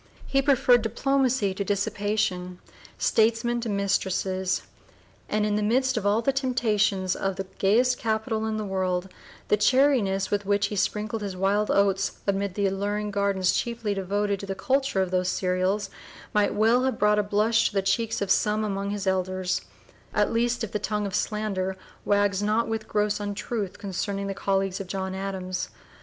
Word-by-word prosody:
He 275 - +2
preferred 255 -3 +4
diplomacy 250 -2 +1
to 200 - -3
dissipation, 200 -2 -1 0.4
statesmen 230 +2 +2
to 230 - -3
mistresses, 190 -2 0 0.7
and 210 0 +1
in 210 0 +1
the - - 0
midst 260 +5 +2
of 210 -3 0
all 215 +3 +2
the 275 - +2
temptations 215 -8 +1
of 195 -1 -2
the 195 - -4
gayest 245 +6 +3
capital 220 0 -1
in 220 0 -2
the 215 - -3
world, 185 -1 -1 0.4
the 210 - +4
chariness 210 -4 +3
with 205 0 0
which 205 0 +2
he - - -2
sprinkled 210 +2 -1
his 195 -3 -4
wild 200 +3 +1
oats 195 -1 +2
amid 200 -1 -1
the 205 - 0
alluring 205 +2 -1
gardens 200 -2 +1
chiefly 230 -3 -1
devoted 200 +1 -1
to 200 - -7
the 195 - -3
culture 270 -4 +1
of 185 - -5
those 185 0 +1
cereals 185 +2 0 0.4
might 210 -1 +2
well 225 +4 +4
have 265 - 0
brought 210 0 +3
a - - +5
blush 210 +3 +2
to - - -6
the 195 - +2
cheeks 220 +2 0
of 195 - -2
some 210 +2 +2
among 200 -1 -2
his 205 -1 -3
elders, 185 -1 0 0.5
at - - +2
least 240 +1 +1
if 220 - -4
the 210 - -1
tongue 210 0 -2
of 195 - -4
slander 195 -3 -1 0.3
wags 205 -1 +2
not 215 +3 +1
with 225 -1 -3
gross 210 0 0
untruth 205 0 -4
concerning 200 0 -3
the 195 - -2
colleagues 195 -1 -1
of 195 - -6
John 190 0 -3
Adams. 190 -1 -4
205 Hz, 175 wpm, -26 LUFS, 195-220 Hz, 0.7 s, a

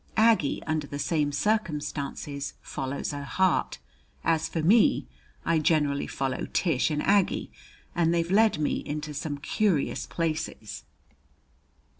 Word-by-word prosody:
Aggie 220 -10 +3
under 155 -2 -1
the 145 - -5
same 145 0 0
circumstances 150 -7 -2
follows 135 +3 -3
her 145 -1 -5
heart. 185 +5 +1 0.5
As 160 -1 +1
for 160 - -2
me, 210 - +4 0.4
I 165 -1 +3
generally 150 -2 +1
follow 135 -1 -2
Tish 165 -7 +1
and 150 -1 -1
Aggie, 200 -1 +2 0.4
and 170 -1 +2
they've 170 +1 0
led 215 -2 +4
me 150 - 0
into 150 0 -4
some 145 0 -3
curious 170 +1 0
places. 160 -9 -3
155 Hz, 125 wpm, -27 LUFS, 145-175 Hz, 0.5 s, me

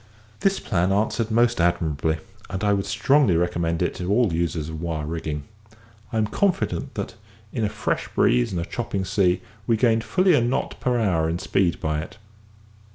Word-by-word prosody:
This 195 0 +2
plan 90 +1 0
answered 110 +3 +1
most 120 -2 +3
admirably, 80 -2 +1 0.3
and 95 +1 -4
I 105 -1 +3
would 100 -1 -1
strongly 115 - +3
recommend 85 -1 0
it - - 0
to 90 +1 -2
all 110 -4 +3
users 80 -2 -1
of 80 0 -6
wire 80 -3 -2
rigging. 75 -2 -4 0.7
I 115 - -2
am 110 - +3
confident 190 - -1
that, - - -4 0.4
in 115 - -1
a 105 - +1
fresh - - -2
breeze - - +2
and 90 - -2
a 85 - -2
chopping 100 -5 -3
sea, 95 -1 +2 0.2
we 115 -2 +3
gained 115 -1 +3
fully 185 +6 +3
a 145 - +4
knot 120 +2 -1
per 125 -1 +1
hour 85 -7 +1
in 85 - -1
speed 90 -1 0
by 75 -1 -1
it. 85 +7 -8
95 Hz, 185 wpm, -24 LUFS, 85-115 Hz, 0.7 s, a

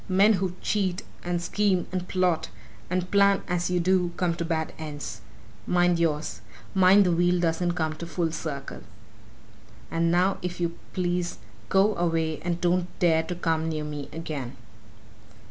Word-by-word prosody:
Men 200 +4 +5
who 185 -2 -1
cheat, 195 -3 0 0.2
and 175 0 -1
scheme, 190 0 +1
and 185 -1 -3
plot, 180 - +1 0.4
and 180 0 -1
plan 200 -1 +4
as 175 0 0
you 180 0 +1
do 180 0 +2
come 180 -2 +1
to 170 0 -3
bad 160 -1 -2
ends. 145 -8 -6 0.5
Mind 175 -1 +3
yours! 155 -2 -1 0.3
Mind 190 +1 +6
the 180 - +3
wheel 175 +1 +3
doesn't 175 +1 +1
come 160 -2 -1
full 170 +1 -2
circle. 155 -4 -5 1.1
And 165 0 +1
now, 180 +3 +2
if 180 0 -4
you 170 -1 -1 0.2
please, 175 -1 -1 0.3
go 195 +2 +4
away 165 -2 0
and 175 -1 -2
don't 175 0 +1
dare 165 -3 +4
to 170 +2 -5
come 160 -2 0
near 155 -1 -2
me 150 -1 -6
again!" 145 -5 -5
175 Hz, 155 wpm, -26 LUFS, 165-180 Hz, 1.1 s, Mind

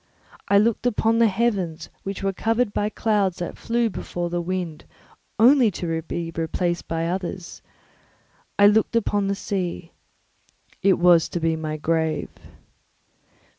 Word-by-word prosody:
I 200 - +4
looked 230 +3 +2 0.2
on 225 +1 +3
the 230 - +6
heavens, 195 -6 -1
which 195 0 -5
were 195 0 0
covered 225 +2 0
by 205 - 0
clouds 205 -5 0
that 175 - -5
flew 235 0 0
before 175 -4 -4
the 175 0 -1
wind, 175 -3 -4 0.5
only 245 +1 +6
to 165 -2 -2
be 165 +1 -5
replaced 175 +1 -2
by 165 0 -2
others; 180 0 -4 1.0
I 205 - +6
looked 210 +2 +4
upon 205 -3 +1
the 200 - 0
sea; 180 -4 -4 0.9
it 195 -1 +4
was 175 -2 +5
to 175 - -3
be 165 0 +1
my 155 -1 -4
grave. 160 0 -1
185 Hz, 140 wpm, -23 LUFS, 170-210 Hz, 1.0 s, the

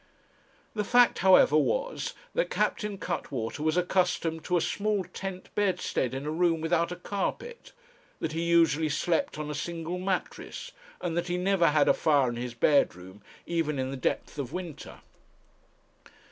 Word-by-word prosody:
The 210 - -1
fact, 245 +3 +4
however, 185 -5 +6
was - - 0 0.2
that - - 0
Captain 210 -2 -1
Cuttwater 115 -10 -4
was 155 +2 +1
accustomed 175 -3 0
to 180 - +2
a - - +3
small 205 +2 0
tent 185 +1 -7
bedstead 185 -10 0
in 135 +2 -4
a 150 - -2
room 165 0 +2
without 170 +1 +1
a - - -3
carpet, 470 - -4 0.5
that 160 - -2
he 165 +1 -2
usually 165 -2 +3
slept 160 +2 0
on 150 0 -4
a - - -3
single 170 +3 -4
mattress, 195 - -4 0.3
and 170 -2 -2
that 175 +1 -1
he 175 0 -1
never 180 -1 +3
had 150 -1 +3
a - - +6
fire 145 -5 +3
in 120 - -4
his 120 0 -5
bedroom, 105 - +1 0.2
even 165 -4 -1
in 130 0 -2
the - - -4
depth 135 +3 -2
of 135 -2 -4
winter. 175 -3 -7
170 Hz, 160 wpm, -28 LUFS, 150-185 Hz, 0.5 s, however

